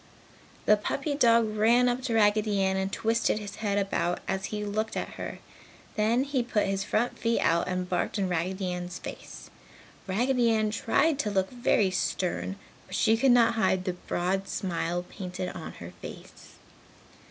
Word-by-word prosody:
The 210 - +6
puppy 275 +7 -2
dog 230 -5 +3
ran 235 +4 +4
up 245 +1 0
to 235 -4 0
Raggedy 210 -1 +3
Ann 190 0 +1
and 190 0 -1
twisted 225 +1 +1
his 205 -2 -7
head 205 -2 -1
about 195 -3 0
as 190 0 -1
he 210 -1 -4
looked 215 +2 -2
at - - -3
her. - - -6 0.6
Then 230 +4 +2
he 275 -2 0
put 235 -3 0
his 195 0 -1
front 230 +4 -1
feet 230 0 +1
out 170 +1 +2
and 180 0 -2
barked 180 +4 -1
in 195 -2 0
Raggedy 180 +2 -1
Ann's 180 0 -5
face. - - -9 0.6
Raggedy 240 +5 +2
Ann 215 -1 +2
tried 280 +7 +1
to 215 - 0
look 190 -2 0
very 240 -5 +2
stern, 185 +1 -1 0.3
but - - -6
she 225 0 +4
could 265 +4 +3
not 235 -2 +5
hide 190 -4 +1
the 185 - -1
broad 185 +2 -2
smile 175 -1 -2
painted 180 -1 -5
on 165 -3 -7
her 85 +1 -10
face. - - -11
205 Hz, 175 wpm, -28 LUFS, 185-230 Hz, 0.6 s, The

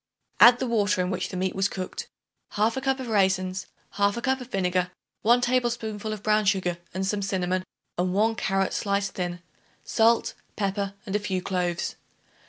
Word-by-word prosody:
Add 240 +1 +9
the 260 - -2
water 210 -5 +1
in 180 +1 -1
which 185 0 -2
the 185 - -5
meat 185 0 0
was 195 +1 +1
cooked, 185 -1 -5 0.5
1/2 225 +5 +1
cup 265 0 0
of 260 - -5
raisins, 190 -3 +1 0.3
1/2 200 +4 +2
cup 265 -1 +1
of 250 - -8
vinegar, 180 -3 0 0.3
1 240 +3 +4
tablespoonful 235 -4 -1
of 210 -2 -5
brown 215 0 +3
sugar 185 -3 +1
and 190 +1 -2
some 200 +1 -1
cinnamon 185 -1 -1 0.4
and 180 0 +1
1 215 +4 +2
carrot 195 -3 0
sliced 200 -1 0
thin, 175 -1 -4 0.4
salt, 230 +1 +3 0.2
pepper 200 -1 -2
and 200 -1 -3
a - - +3
few 195 -3 -2
cloves. 180 -2 -2
200 Hz, 175 wpm, -26 LUFS, 185-220 Hz, 0.5 s, Add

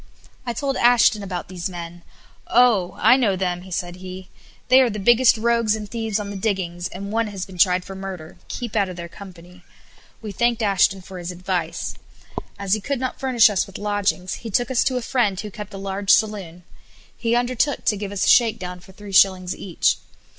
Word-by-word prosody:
I 240 - -1
told 275 +3 -2
Ashton 240 -2 +4
about 185 -3 -5
these 185 +1 -5
men. 175 -1 -8 0.5
"Oh! 230 -7 +3
I 225 +4 +6
know 220 -7 +2
them," 180 0 -3
said 175 0 -4
he, 185 0 -9 0.4
"they 260 +2 +7
are 255 - +3
the 210 - -5
biggest 240 +4 +5
rogues 230 -1 +2
and 210 -1 -6
thieves 225 -2 -2
on 205 -1 -5
the - - -6
diggings, 185 -4 -2
and 200 +2 -7
one 225 0 0
has 195 -3 -5
been 185 -2 -13
tried 180 0 +3
for 195 - -8
murder; 190 -4 -8
keep 240 -3 -6
out 200 -3 +2
of 180 - -7
their 170 -1 -7
company." 180 -1 -13 0.6
We 215 -2 -7
thanked 235 +3 0
Ashton 195 -1 +2
for 185 0 -9
his 175 0 -6
advice. 180 -2 -3 0.6
As 200 -1 -1
he 215 - +1
could 275 +3 -2
not 255 0 -3
furnish 255 -4 +5
us 205 -4 0
with 195 - -9
lodgings, 205 -3 -1
he 230 - -6
took 245 +5 0
us 250 - +3
to 260 -1 +1
a 250 - -3
friend 215 -8 0
who 210 0 -6
kept 210 0 -8
a 195 - -8
large 195 0 -5
saloon. 200 -5 +2 0.5
He 235 0 0
undertook 250 +3 0
to 210 - +3
give 200 0 -5
us 200 -1 -1
a - - -1
shakedown 210 -7 +3
for 190 +2 -17
three 205 0 -11
shillings 185 -2 +4
each. 180 -4 0
200 Hz, 205 wpm, -22 LUFS, 185-230 Hz, 0.6 s, they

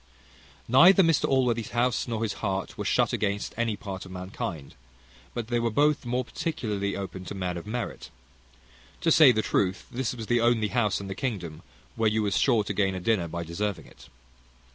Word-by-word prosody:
Neither 175 +11 +7
Mr 165 -3 +3
Allworthy's 125 -4 +1
house, 125 +1 +1
nor 115 -2 -2
his 110 - -1
heart, 95 -2 -2
were - - -5
shut - - +2
against 100 0 -1
any 115 -2 0
part 95 -2 -7
of 95 - -11
mankind, 90 -5 -6 0.6
but 120 -2 -4
they 120 -1 +1
were 115 0 0
both 145 +3 +2
more 125 +1 -1
particularly 105 - -3
open 95 -1 -6
to 100 - -6
men 90 -2 -3
of 85 +3 -7
merit. 120 +2 -5 0.9
To 165 - +2
say 150 -4 +8
the 110 -2 0
truth, 95 0 0
this 125 0 -2
was 115 -2 -6
the 120 +1 +2
only 115 -2 +2
house 105 -5 +1
in 100 - -7
the 95 - -4
kingdom 95 - -4 0.3
where 110 -1 +2
you 110 0 0
was 100 -2 0
sure 120 -6 +3
to - - -4
gain 95 -2 +1
a - - -3
dinner 95 -2 +1
by 85 +1 -4
deserving 100 +5 -3
it. - - -17
110 Hz, 195 wpm, -27 LUFS, 95-120 Hz, 0.9 s, say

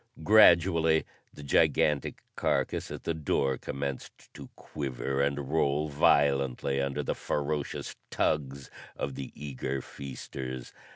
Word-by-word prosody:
Gradually, 85 -5 +5 0.3
the 75 - -11
gigantic 70 +1 +2
carcass - - 0
at - - -7
the 85 - -1
door 70 -4 0
commenced 70 -1 -6
to - - -10
quiver 70 -1 -3
and 70 0 -1
roll 75 -1 +1
violently 70 -2 +2
under 70 +1 -2
the - - -1
ferocious 75 0 -3
tugs 70 -2 -1 0.2
of 70 - -3
the 65 0 -7
eager 70 -1 -4
feasters. 65 -1 -7
70 Hz, 115 wpm, -29 LUFS, 70-75 Hz, 0.3 s, Gradually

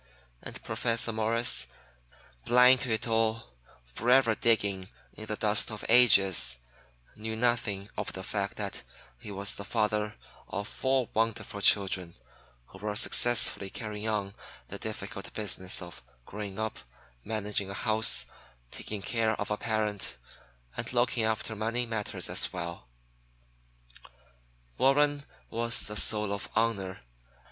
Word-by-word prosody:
And - - -8
Professor 115 0 0
Morris, 110 - +2 0.8
blind 125 +1 +7
to 130 - -3
it 110 +2 -1
all, 115 - 0 0.3
forever 115 - +3
digging 100 -4 +1 0.2
in 110 - -8
the 105 - -2
dust 105 +1 +1
of 110 -2 -6
ages, 95 - +6 0.6
knew 110 +1 -4
nothing 110 -4 0
of 105 - -3
the 95 - -6
fact 100 0 -2
that - - -4 0.4
he - - -8
was 100 0 -2
the 100 - -7
father 105 -1 0 0.3
of 100 +1 -4
four 130 -2 0
wonderful 110 -2 -1
children 95 -4 +3 0.5
who - - -13
were 105 0 -3
successfully 115 -3 +2
carrying 105 0 -5
on 100 -2 -2 0.4
the - - -6
difficult - - -6
business 95 -3 -1
of 85 - -10 0.2
growing 100 -1 -6
up, 110 0 -3 0.4
managing 105 -2 -2
a 100 - -5
house, 110 0 +3 0.5
taking 105 -2 -6
care 110 +2 0
of 105 - -3
a 105 - +1
parent, 105 - -2 0.6
and - - -2
looking 120 -2 +2
after 110 0 -1
money 115 +3 -1
matters 110 -3 -3
as - - +2
well. 85 -6 -6 1.9
Warren 145 +1 +3 0.3
was 115 +1 +1
the 105 - -4
soul 105 -1 +2
of 100 - -5
honor. 100 -4 0
110 Hz, 130 wpm, -30 LUFS, 100-115 Hz, 1.9 s, blind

